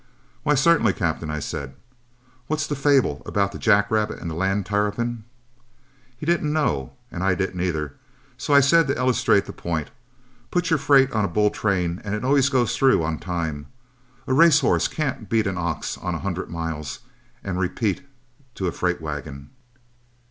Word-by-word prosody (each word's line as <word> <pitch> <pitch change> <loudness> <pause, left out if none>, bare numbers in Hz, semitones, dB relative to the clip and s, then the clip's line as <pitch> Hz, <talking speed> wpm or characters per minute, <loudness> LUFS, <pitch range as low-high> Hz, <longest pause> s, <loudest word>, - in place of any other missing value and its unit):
"'Why, 150 +4 +2
certainly, 145 - +4
Captain,' 80 -2 -2
I 75 - -2
said. 70 -2 -5 0.7
'What's 155 0 -1
that 145 - -3
fable 140 -1 +2
about 100 -1 0
the - - -8
jack 100 -2 +3
rabbit 110 -1 0
and 85 - -6
the - - -4
land 95 +3 0
tarrapin?' 105 +3 -1 0.9
He 150 - -7
didn't 160 -2 +1
know 70 - 0 0.2
and 90 - -4
I 95 -1 +2
didn't 95 -1 -2
either, 80 -6 -2 0.4
so - - -4
I 140 0 +7
said 165 +4 +4
to 135 - 0
illustrate 125 -5 +2
the - - -8
point: 80 -3 -4 0.6
'Put 175 -1 0
your 160 - +3
freight 135 -1 +4
on 110 -3 0
a - - +1
bull 105 +4 +2
train, 90 -4 -1
and 100 0 -2
it 105 +4 -4
always 140 0 +4
goes 125 -4 +1
through 130 -11 +4
on 80 -1 -2
time. 80 -5 -4 0.6
A 130 - 0
race 160 +1 +6
horse - - +2
can't 135 -9 -3
beat 110 -1 +2
an 95 -2 -2
ox 85 -2 -3
on 90 -1 -3
a - - -4
hundred 95 -1 -3
miles 80 +1 -5 0.4
and 95 -2 -3
repeat 100 +6 -1 0.5
to 95 - -3
a 90 - 0
freight 90 -1 -1
wagon.' 75 -2 -6
100 Hz, 180 wpm, -23 LUFS, 85-135 Hz, 0.9 s, I